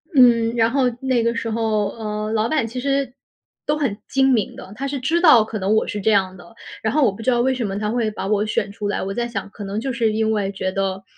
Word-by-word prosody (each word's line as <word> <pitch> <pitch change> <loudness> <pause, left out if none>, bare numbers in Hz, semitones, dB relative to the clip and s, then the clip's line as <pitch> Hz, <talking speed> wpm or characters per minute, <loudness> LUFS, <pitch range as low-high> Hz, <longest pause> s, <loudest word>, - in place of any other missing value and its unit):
嗯， 235 -3 +5
然 230 0 +2
后 270 +1 +2 0.2
那 260 -3 +1
个 235 0 0
时 230 0 -3
候， 220 -2 0
呃， 215 0 -4
老 220 +1 +1
板 300 -6 +1
其 240 +3 -5
实 275 -1 -1 0.5
都 300 - 0
很 260 -9 -1
精 270 0 +2
明 215 -5 0
的， 195 - -10
他 275 +4 -3
是 275 -1 -3
知 325 +7 0
道 280 -11 +7
可 215 0 -5
能 195 +3 +1
我 220 - +1
是 210 -2 -4
这 220 - +2
样 190 -2 +2
的。 205 +5 -15 0.3
然 220 +2 -1
后 305 - +3
我 215 - +3
不 195 - -10
知 225 - 0
道 240 -1 +3
为 260 +2 +2
什 250 -3 -2
么 195 -1 -3
他 210 0 -2
会 230 -2 0
把 210 -2 -5
我 210 0 +1
选 205 -1 -1
出 205 0 -5
来， 205 - -2
我 195 +1 -3
在 240 +2 -2
想 200 -4 -5
可 210 - -9
能 200 +2 -3
就 260 +2 -3
是 230 -2 +1
因 220 0 0
为 200 -2 -1
觉 190 -1 -3
得， 195 0 -2
225 Hz, 295 characters per minute, -21 LUFS, 205-250 Hz, 0.5 s, 道